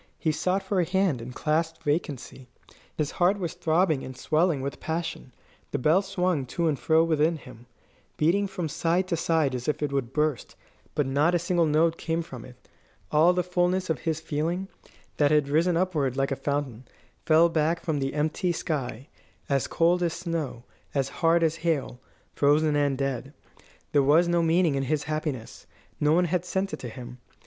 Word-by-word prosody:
He 160 - 0
sought 185 +5 0
for 190 0 0
a - - +4
hand, 180 -7 +1
and 120 +2 -7
clasped 160 +1 -1
vacancy. 145 -4 -3 0.5
His 150 -2 -1
heart 185 +3 +2
was 175 -5 -3
throbbing 160 -3 +1
and 130 0 -8
swelling 155 -2 +1
with 140 +1 -5
passion; 160 -5 -4 0.4
the - - -2
bell 155 +8 +3
swung 180 -8 -1
to 170 +6 -1
and 150 -4 0
fro 160 0 +3
within 160 0 +2
him, 125 -4 -14 0.5
beating 185 +6 +2
from 185 -3 -4
side 170 +5 0
to 170 - +1
side 160 -4 +1
as 125 -1 -4
if 150 0 -1
it 145 - -1
would 135 -4 -2
burst; 150 -3 -1 0.4
but 150 - +1
not 145 +6 +2
a - - +5
single 170 -1 +1
note 160 +2 +2
came 165 0 -1
from 130 -8 -10
it. 125 - -13 0.6
All 160 +4 +5
the 180 0 0
fulness 180 0 0
of 150 - -2
his 160 +1 -2
feeling, 165 +5 -2 0.5
that 145 -1 +4
had 150 -2 +3
risen 165 +4 +2
upward 155 -8 0
like 135 0 0
a - - +1
fountain, 135 -4 -3 0.4
fell 160 +1 +6
back 165 0 +1
from 155 -3 -2
the 135 +1 -2
empty 155 +4 0
sky, 135 -7 -3 0.4
as 140 -2 +1
cold 175 +2 +2
as 170 -2 0
snow, 165 -8 -4 0.3
as 135 -1 +1
hard 165 0 +4
as 165 0 +1
hail, 155 -7 -1 0.3
frozen 150 +1 +3
and 145 -2 +1
dead. 135 0 -3 0.6
There 145 - +4
was 155 +6 +4
no 175 0 +2
meaning 165 -1 +3
in 135 - 0
his 145 +2 -1
happiness. 155 -6 -4 0.3
No 150 0 +3
one 175 +3 +4
had 175 +1 0
sent 190 +2 -2
it - - -4
to 125 - -6
him. 125 +1 -10
155 Hz, 190 wpm, -26 LUFS, 140-170 Hz, 0.6 s, fell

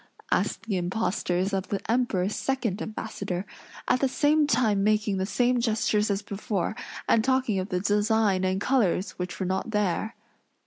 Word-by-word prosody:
asked - - 0
the 210 -4 -1
impostors 185 0 -1
of 190 0 -1
the 200 - -2
Emperor's 220 -5 +1
second 235 -7 -1
ambassador; 200 -4 -4 0.4
at 255 - +3
the 270 - +2
same 295 +3 +3
time 225 -7 +2
making 210 -1 +2
the 190 0 -1
same 245 +2 +2
gestures 220 -2 +1
as 200 0 -1
before, 200 -1 -2 0.3
and 220 - +4
talking 260 -5 +1
of 185 +2 -4
the 180 -2 0
design 205 -1 +2
and 185 0 +1
colors 205 -6 +1
which 180 0 -4
were 190 - -1
not 190 +5 -1
there. 210 +1 -1
210 Hz, 165 wpm, -27 LUFS, 190-230 Hz, 0.4 s, and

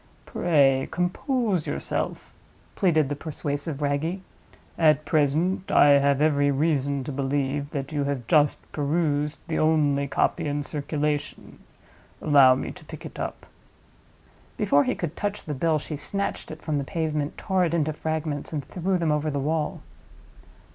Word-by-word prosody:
"Pray 140 -6 +2
compose 185 - -1
yourself," - - -3 0.4
pleaded 160 -7 +2
the 145 - -2
persuasive 145 -1 -4
Wragge. 150 +6 -1 0.6
"At 155 -2 +3
present 160 +6 +1
I 145 - +6
have 140 +1 +2
every 145 -2 +3
reason 140 -1 0
to 145 - -5
believe 140 +1 -1
that 140 0 -4
you 145 -2 -1
have 140 -4 -2
just 150 +3 +3
perused 150 0 0
the 160 - -1
only 145 -3 +2
copy 160 +3 0
in 145 0 -1
circulation. 150 0 -3 0.6
Allow 140 -4 +6
me 130 - -4
to - - -14
pick - - -10
it - - -9
up." - - -5 1.1
Before 145 0 +3
he - - 0
could 170 -1 -4
touch 205 0 -3
the 150 - -3
bill 155 +3 +1
she 150 +1 -5
snatched 200 +7 -3
it 155 0 -9
from 150 -3 -1
the - - -2
pavement, 155 -1 -2
tore 190 -1 +1
it 170 0 -1
into 155 -1 0
fragments, 155 -1 -3
and 145 -4 -3
threw 185 +4 -1
them 165 -3 0
over 150 +1 0
the 145 -1 -2
wall. 150 +2 -1
150 Hz, 155 wpm, -25 LUFS, 140-160 Hz, 1.1 s, I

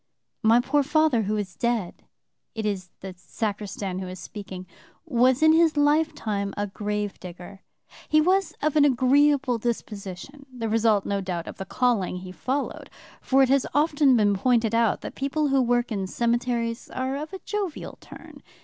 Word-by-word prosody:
"My 225 +1 +5
poor 275 +4 +2
father 300 -3 +2
who 215 +1 -1
is 195 -3 -4
dead" 235 -7 -2 0.5
(it 220 -1 -3
is 190 -3 -3
the 190 -1 -7
sacristan 200 -1 -4
who 190 - -5
is 185 0 -8
speaking,) 190 -3 -8 0.4
"was 255 +3 +3
in 315 0 +7
his 325 -2 +3
lifetime 290 -10 +1
a 205 - 0
grave 210 0 -4
digger. 180 +2 -10 0.5
He 310 - +5
was 370 +3 +2
of 305 0 +1
an 300 - +5
agreeable 275 -1 +3
disposition, 225 +4 -5
the 235 -3 -4
result, 220 -2 +2
no 200 -1 -1
doubt, 180 -3 -4
of - - -9
the 190 - -6
calling 235 -8 0
he 180 0 -8
followed, 265 +9 -3 0.3
for 270 +1 +3
it 260 - +2
has 275 0 +3
often 290 -3 +4
been 205 -2 +3
pointed 230 +2 +1
out 230 -1 +2
that - - -7
people 285 +2 -1
who 270 -1 +3
work 240 0 +1
in 195 -3 -2
cemeteries 235 +1 -1
are 260 +1 -3
of 300 +2 -5
a 385 - -6
jovial 405 -6 -4
turn. - - -13
235 Hz, 170 wpm, -25 LUFS, 200-280 Hz, 0.5 s, in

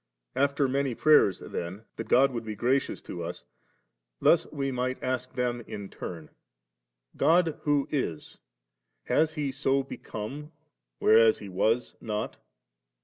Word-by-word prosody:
After 140 0 +2
many 135 -1 0
prayers* 150 - +5
then 90 +5 -5
that - - -5
God 135 +2 +5
would 120 -2 -4
be 110 -1 -5
gracious 130 +6 0
to - - -6
us, - - -6 0.7
thus - - +3
we 135 -1 -2
might 130 0 -1
ask 130 0 -2
them 120 -1 -1
in 100 -2 -7
turn 80 -3 -8 0.4
;* - - -33
God 165 -1 +4
who 145 -1 +2
is, 105 - -3 0.6
has 155 0 +2
He 145 -3 -1
so 135 0 +1
become, 135 +4 -7 0.5
whereas 110 0 +6
He 100 - -9
was 110 +6 0
not? 105 -2 -3
125 Hz, 140 wpm, -28 LUFS, 105-140 Hz, 0.7 s, whereas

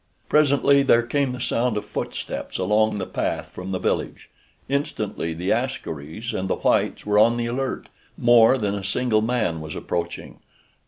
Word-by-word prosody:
Presently 140 -1 +4
there 120 -3 +4
came 135 +2 0
the 125 - -6
sound 120 -2 0
of 105 - -3
footsteps - - -5
along 105 +3 +2
the 95 - -3
path - - -3
from 90 +1 -8
the 95 - 0
village. - - -3 0.4
Instantly 105 - -2
the 90 +3 -2
askaris 115 - -3
and 95 0 -2
the - - +1
whites - - 0
were 105 0 +3
on 115 +2 +5
the 120 - -1
alert. 130 +3 -3 0.3
More 120 +1 +6
than 105 -4 -1
a 100 -1 -4
single 110 +2 +1
man 110 -8 -1
was 80 0 -7
approaching. 85 0 -4
110 Hz, 165 wpm, -23 LUFS, 95-125 Hz, 0.4 s, More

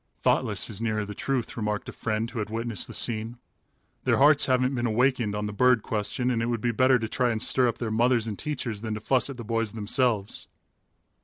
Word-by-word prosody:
"Thoughtless - - +1
is 105 0 -5
nearer 110 -2 -1
the 105 - -7
truth," 130 +2 -2
remarked 105 -2 -2
a - - -5
friend 110 0 -2
who 120 - -5
had 105 - -3
witnessed 115 0 -3
the - - -9
scene. 115 +1 -1 0.7
"Their - - +2
hearts 145 +1 +5
haven't 130 0 +2
been 120 -2 -1
awakened 120 -2 +1
on 105 0 -2
the 105 - -4
bird 125 +1 +3
question 115 +4 -1
and 115 -2 0
it 115 - -1
would 120 -2 -1
be 120 +2 0
better 130 +3 +4
to 110 -2 -3
try 125 +2 0
and 115 -2 -1
stir 125 +2 +3
up 115 -1 -1
their 115 -3 -3
mothers 120 +1 +2
and 105 -3 -5
teachers 125 -8 -4
than 110 -1 -3
to - - -4
fuss 130 +5 +1
at 135 - -7
the 120 - -6
boys 115 -1 -1
themselves." 110 -1 0
115 Hz, 230 wpm, -26 LUFS, 110-125 Hz, 0.7 s, hearts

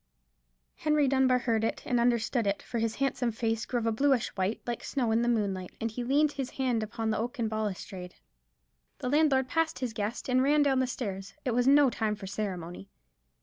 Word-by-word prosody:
Henry 300 -2 +2
Dunbar 265 -1 +3
heard 230 -3 0
it 225 - -2
and 245 - +1
understood 235 -1 +1
it, 200 - -1
for 235 - -3
his 225 0 -1
handsome 270 -3 0
face 225 0 -2
grew 245 - 0
of 230 - -4
a 225 - +2
bluish 265 +1 +2
white, 190 +3 -2
like 240 -1 -4
snow 245 -5 -1
in 225 +1 +3
the 240 - +1
moonlight, 195 -5 -1
and 225 0 -2
he 245 +3 -4
leaned 285 +4 +3
his 270 -3 -4
hand 250 -4 0
upon 220 +1 -2
the 215 - -1
oaken 235 0 -2
balustrade. 195 -4 -4 0.8
The 250 - -3
landlord 280 -3 +3
passed 325 +3 0
his 250 -4 -3
guest, 215 +2 -3
and 255 0 +3
ran 290 +2 +4
down 270 -2 +2
the 260 - +1
stairs. 195 -6 -5
It 250 - +1
was 245 +2 +2
no 280 -1 +6
time 215 -2 -1
for 205 -1 -9
ceremony. 180 - -5
235 Hz, 205 wpm, -29 LUFS, 215-265 Hz, 0.8 s, no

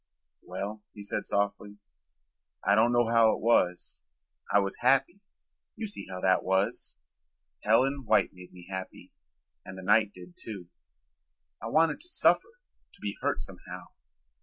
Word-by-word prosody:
"Well," 100 +4 -6
he 105 - -9
said 100 - -3
softly, 100 0 -1 0.9
"I - - +4
don't 115 +2 +4
know 120 0 +3
how 115 -1 +5
it - - -8
was. 90 -6 +1 0.5
I - - +5
was 100 -1 0
happy. 135 +9 +2 0.6
You 225 - -4
see 210 - -6
how 95 -1 -6
that 95 -1 +3
was. 95 +1 -1 0.7
Helen 130 +5 +2
White - - +3
made 90 -1 -13
me 90 -1 -13
happy 95 -1 -7 0.5
and 95 - -9
the 95 - -8
night 105 +2 +4
did 90 -2 -13
too. 95 -6 -9 0.9
I 110 - -5
wanted 160 - +3
to 350 - -7
suffer, 470 +6 +2 0.3
to - - -19
be 100 -1 -4
hurt - - 0
somehow. - - -8
105 Hz, 150 wpm, -29 LUFS, 95-120 Hz, 0.9 s, how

